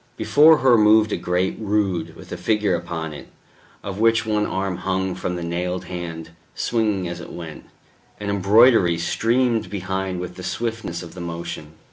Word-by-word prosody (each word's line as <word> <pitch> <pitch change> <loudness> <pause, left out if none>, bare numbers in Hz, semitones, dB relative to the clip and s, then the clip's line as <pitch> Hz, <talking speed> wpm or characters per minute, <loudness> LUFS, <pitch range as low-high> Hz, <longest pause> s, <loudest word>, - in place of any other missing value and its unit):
Before 155 +2 +6
her 125 -4 +4
moved 110 0 +5
a - - +1
great 90 +1 -1
rood, 95 -6 -1
with - - -13
a - - -3
figure 105 -3 +1
upon 85 -2 -4
it, - - -10 0.6
of 100 0 -5
which 115 0 +3
one 105 -1 0
arm 95 -1 -2
hung 95 0 -1
from 90 0 -3
the 85 - -4
nailed 90 +2 -3
hand, 85 -2 -6 0.2
swinging 105 -6 0
as 85 0 -6
it - - -10
went; 80 -3 -9 0.5
an 100 -1 -3
embroidery 100 -2 +5
streamed 115 +8 +1
behind 95 -1 -3
with 90 0 -7
the 90 - -8
swiftness 115 -8 -4
of 85 - -11
the 90 - -8
motion. 85 -2 -6
95 Hz, 170 wpm, -22 LUFS, 85-110 Hz, 0.6 s, Before